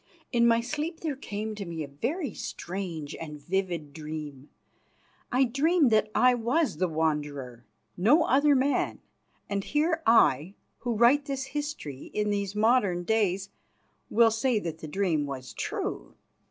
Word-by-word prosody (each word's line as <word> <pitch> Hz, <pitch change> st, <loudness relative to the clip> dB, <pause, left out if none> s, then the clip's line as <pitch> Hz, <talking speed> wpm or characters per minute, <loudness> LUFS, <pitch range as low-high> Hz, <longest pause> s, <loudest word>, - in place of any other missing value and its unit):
In 235 Hz, -1 st, +4 dB
my 230 Hz, 0 st, +4 dB
sleep 305 Hz, +6 st, -4 dB
there 310 Hz, -4 st, -2 dB
came 215 Hz, -4 st, -5 dB
to 210 Hz, -1 st, -5 dB
me 165 Hz, -3 st, -5 dB
a -, -, -6 dB
very 240 Hz, -, -3 dB
strange 170 Hz, -5 st, -5 dB
and 150 Hz, -2 st, -7 dB
vivid 175 Hz, -3 st, -2 dB
dream. 150 Hz, -3 st, -7 dB, 0.8 s
I 255 Hz, +2 st, +4 dB
dreamed 280 Hz, +3 st, +3 dB
that 215 Hz, -1 st, +3 dB
I 250 Hz, 0 st, +5 dB
was 245 Hz, +7 st, 0 dB
the 185 Hz, -, +1 dB
Wanderer, 150 Hz, -6 st, -2 dB, 0.3 s
no 240 Hz, -, +4 dB
other 285 Hz, +2 st, +4 dB
man, 270 Hz, +2 st, +1 dB, 0.5 s
and 200 Hz, -1 st, -2 dB
here 320 Hz, -, +1 dB
I, 190 Hz, -, +4 dB, 0.2 s
who 240 Hz, -2 st, -2 dB
write 250 Hz, +6 st, +5 dB
this 275 Hz, -2 st, -3 dB
history 290 Hz, -, -5 dB
in 210 Hz, 0 st, +1 dB
these 200 Hz, -1 st, -2 dB
modern 210 Hz, -5 st, +3 dB
days, 200 Hz, -2 st, +1 dB, 0.6 s
will 230 Hz, 0 st, +5 dB
say 225 Hz, +2 st, +1 dB
that 165 Hz, -5 st, -4 dB
the 155 Hz, -, -7 dB
dream 160 Hz, -4 st, 0 dB
was 130 Hz, -2 st, -7 dB
true. -, -, -4 dB
210 Hz, 150 wpm, -28 LUFS, 160-255 Hz, 0.8 s, I